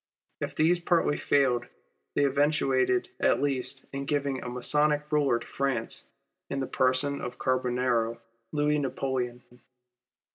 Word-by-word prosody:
If - - -4
these 170 +3 +3
partly 170 -3 +2
failed, 125 -4 +2 0.5
they 145 - +3
eventuated 145 - +2
at - - +3
least 135 -1 -2
in 140 0 -3
giving 140 -2 -1
a - - -5
Masonic 150 +4 +2
Euler 140 -5 +3
to - - -9
France 140 -1 -2 0.4
in 140 - -2
the 135 - -1
person 130 +3 +1
of 125 - -4
the - - -25
Carbonaro, 125 -2 0 0.3
Louis 150 0 +1
Napoleon. 130 -3 -2
135 Hz, 135 wpm, -28 LUFS, 125-145 Hz, 0.5 s, these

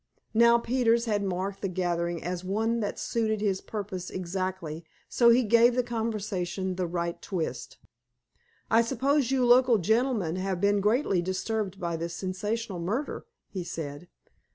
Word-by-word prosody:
Now, 235 +1 +6
Peters 235 -1 +2
had 210 -3 0
marked 195 +1 -3
the 195 - -1
gathering 175 -2 -1
as 180 +1 -3
one 220 +5 0
that 205 -2 -3
suited 220 -2 -1
his 200 -3 0
purpose 195 -4 -5
exactly, 185 -3 -4 0.2
so 235 -1 +4
he 240 +2 +5
gave 235 +2 +5
the 250 - +2
conversation 205 -6 -2
the 180 -1 -1
right 170 0 -3
twist. 165 -9 -4 0.9
"I 225 +1 +6
suppose 265 +3 +1
you 260 -2 +2
local 245 -1 +6
gentlemen 215 -3 +1
have 190 -1 -2
been 200 +1 +3
greatly 210 -3 +2
disturbed 190 +2 -2
by 170 -3 -2
this 170 +1 -4
sensational 200 +1 -3
murder?" 225 - -3 0.2
he 185 -3 -5
said. 155 -1 -6
200 Hz, 150 wpm, -28 LUFS, 180-230 Hz, 0.9 s, Now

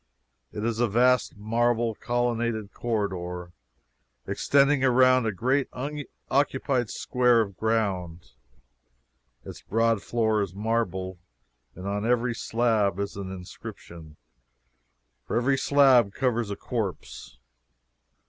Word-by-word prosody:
It 105 - -4
is 115 -1 -1
a 120 - +3
vast 125 +1 +2
marble 115 +2 +1
collonaded 115 -3 -1
corridor 90 -6 -3 0.7
extending 140 -1 +2
around 130 -1 +4
a - - +1
great 130 +7 0
unoccupied 140 -2 -2
square 125 -2 +2
of 100 -3 -4
ground; 90 - -2 1.1
its - - -9
broad 115 -1 +1
floor 110 -2 0
is 95 -2 -4
marble, 95 -4 -2 0.6
and 90 +2 -7
on 100 +1 -2
every 120 +1 +1
slab 110 -5 0
is 100 0 -3
an 100 -1 -6
inscription 85 -3 -10 1.1
for - - -2
every 130 +3 +2
slab 130 -7 +4
covers 120 -4 0
a 100 - -3
corpse. 110 -6 -5
115 Hz, 110 wpm, -26 LUFS, 100-125 Hz, 1.1 s, around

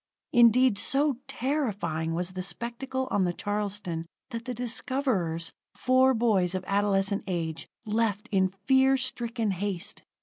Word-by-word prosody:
Indeed, 240 -1 +5
so 275 +3 +2
terrifying 205 - -1
was 175 +1 -2
the 185 0 -4
spectacle 240 +7 -3
on 200 - +2
the 175 -1 0
Charleston, 205 -5 -3 0.2
that 230 0 -5
the 250 - -3
discoverers, 230 - 0 0.2
four 260 0 +4
boys 200 -6 +2
of 185 - -2
adolescent 200 0 +1
age, 165 -3 -3 0.2
left 215 0 0
in 190 -2 +3 0.2
fear 265 +1 +5
stricken 235 -4 -1
haste. 190 -1 -4
210 Hz, 130 wpm, -28 LUFS, 185-255 Hz, 0.2 s, Indeed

